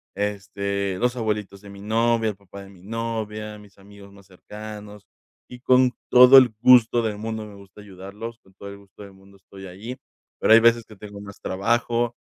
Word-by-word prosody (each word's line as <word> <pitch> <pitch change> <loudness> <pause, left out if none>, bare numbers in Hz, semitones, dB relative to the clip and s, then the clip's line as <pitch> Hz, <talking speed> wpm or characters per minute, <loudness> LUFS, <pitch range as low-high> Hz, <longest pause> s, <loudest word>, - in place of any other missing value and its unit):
este, 100 -1 -3
los 125 +1 0
abuelitos 105 -4 -4
de 100 - -14
mi 100 0 -12
novia, 115 +1 0
el 105 - -6
papá 100 0 -13
de 95 - -14
mi 95 -2 -18
novia, 110 -1 -5
mis 105 -1 -18
amigos 100 0 -16
más 100 -1 -19
cercanos 105 +1 -11 0.4
y 125 - -11
con 130 0 +3 0.2
todo 125 +2 +8
el 125 -4 +6
gusto 120 -2 +5
del 110 -2 -3
mundo 110 0 -5
me 105 -1 -13
gusta 100 +1 -16
ayudarlos 100 +4 -10
con 95 - -26
todo 100 - -11
el 100 - -10
gusto 100 0 -19
del 100 - -13
mundo 95 +1 -20
estoy 95 +1 -14
allí, 105 +8 -9 0.4
pero 110 - +4
hay 115 - +8
veces 115 0 +3
que 110 - -15
tengo 100 0 -11
más 100 0 -12
trabajo, 120 +4 -1
105 Hz, 195 wpm, -23 LUFS, 100-115 Hz, 0.4 s, todo